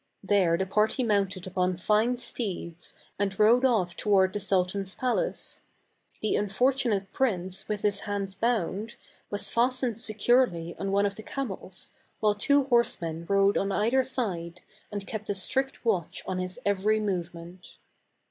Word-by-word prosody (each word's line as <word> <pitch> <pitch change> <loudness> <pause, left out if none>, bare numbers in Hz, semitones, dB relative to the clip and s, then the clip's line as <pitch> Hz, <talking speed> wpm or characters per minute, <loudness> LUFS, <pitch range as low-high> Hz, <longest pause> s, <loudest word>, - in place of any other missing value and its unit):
There 190 -4 +3
the 190 - 0
party 215 +6 +2
mounted 195 -5 0
upon 185 -1 0
fine 215 +6 +2
steeds 185 -8 -5 0.2
and 195 -2 -1
rode 230 +4 +5
off 210 -9 +2
toward 190 -3 +3
the 205 - -2
sultan's 190 0 0
palace. 260 - -2 0.6
The 215 - +1
unfortunate 215 -1 +1
prince 190 -7 -1
with 210 -1 -3
his 205 -1 +2
hands 200 -2 -3
bound, 215 0 -1 0.3
was 205 -1 -2
fastened 245 -1 +1
securely 215 -6 +2
on 195 - -2
one 200 +1 +3
of 200 - 0
the 220 - -9
camels, 215 -7 -5 0.3
while 210 -1 +3
two 280 +7 +3
horsemen 170 -10 0
rode 200 0 +4
on 195 0 -1
either 235 +7 +2
side, 180 -10 -3 0.3
and 205 -1 -4
kept 215 0 -6
a 205 - 0
strict 265 +8 -1
watch 190 -8 -1
on 185 -1 -2
his 185 0 -4
every 200 +2 +2
movement. 175 -3 -5
200 Hz, 145 wpm, -28 LUFS, 185-230 Hz, 0.6 s, rode